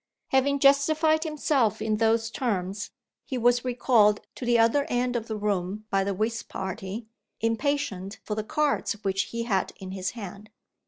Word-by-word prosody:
Having 275 +1 +3
justified 310 +3 +4
himself 290 - +1
in 215 0 0
those 225 0 +2
terms, 205 -5 -2 0.3
he 260 - -4
was 245 0 +3
recalled 240 -4 +3
to 250 - -7
the 240 -1 +4
other 230 +5 +3
end 245 0 0
of 230 -1 -2
the 220 - -3
room 205 0 -2
by 195 0 +2
the 195 0 -2
whist 225 +3 -2
party, 190 +3 -5 0.3
impatient 225 -5 -1
for 215 - -3
the 215 0 -2
cards 295 +4 0
which 195 0 0
he 230 0 -4
had 200 -5 0
in 185 -1 -7
his 190 -1 -2
hand. 205 0 -8
225 Hz, 165 wpm, -27 LUFS, 200-255 Hz, 0.3 s, justified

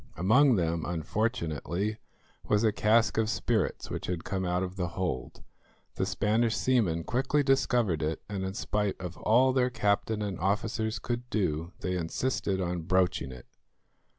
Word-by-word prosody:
Among 125 +8 +5
them, 85 -3 0
unfortunately, 90 - -2 0.5
was 105 +1 +2
a 110 - +4
cask 110 +2 +3
of 110 -1 +1
spirits 115 -3 -1
which - - -4
had 85 -2 -3
come 95 -1 -2
out 90 +1 0
of 95 0 -5
the 90 -2 -1
hold. 90 -9 -3 0.5
The 95 - -1
Spanish 110 +4 +1
seamen 105 -11 +1
quickly 135 - +1
discovered 120 - +2
it, 80 +1 -1
and 100 -2 -4
in 95 +1 -4
spite 105 -2 -1
of 90 -2 -6
all 130 +4 +4
their 125 -1 +2
captain 105 -2 0
and 100 -4 -4
officers 110 +4 0
could 120 0 -4
do, 85 -4 -1
they 90 0 -1
insisted 95 +3 -1
on 90 -1 -2
broaching 90 -4 +1
it. 65 -1 -11
100 Hz, 155 wpm, -29 LUFS, 90-115 Hz, 0.5 s, Among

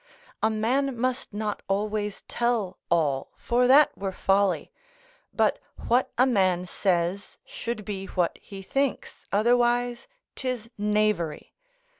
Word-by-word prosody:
A 220 - +3
man 245 +5 0
must 255 +1 -1
not 210 0 -3
always 210 +1 -2
tell 230 -6 -1
all, 145 -6 +1
for 245 +1 +1
that 280 +3 +6
were 195 -1 -3
folly: 195 +1 +1 0.6
but - - +1 0.3
what 245 +2 +3
a 255 - +6
man 185 -7 +2
says 180 +1 -1
should 230 -3 -5
be 195 -2 -5
what 175 -2 -1
he 195 -1 -10
thinks, 275 +6 -2
otherwise 240 - +2 0.3
'tis 250 -4 -4
knavery. 210 -6 0
210 Hz, 120 wpm, -26 LUFS, 195-245 Hz, 0.6 s, that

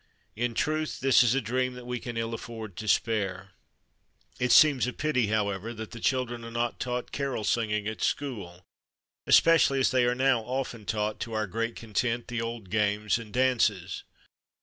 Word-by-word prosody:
In 120 +1 -2
truth, 155 +3 -1
this 135 -1 +5
is 125 0 +3
a 135 - +1
dream 125 +2 -1
that 125 -1 -10
we 125 0 -3
can 120 0 -6
ill 115 0 -2
afford 110 -4 -7
to 110 - -6
spare. 95 -4 0 0.9
It 125 0 +1
seems 140 -6 +6
a 125 - -3
pity, 145 -7 0
however, 105 +1 -1
that 110 0 -7
the 120 - -8
children 120 -1 -1
are 115 - -7
not 120 0 -2
taught 125 -1 -3
carol 135 -6 -2
sing 115 +1 +1
ing 105 0 -1
at 110 0 -5
school, 95 -11 -3 0.6
especially 150 -5 +5
as 130 - +3
they 130 -2 +3
are 120 0 +1
now 130 -2 +3
often 125 -3 -4
taught, 105 0 -1
to 115 - -5
our 110 -1 0
great 115 +4 -3
content, 115 +2 -2
the 120 -1 -2
old 115 -5 -6
games 105 0 +1
and 110 -2 -10
dances. 115 -8 +1
115 Hz, 185 wpm, -28 LUFS, 110-125 Hz, 0.9 s, seems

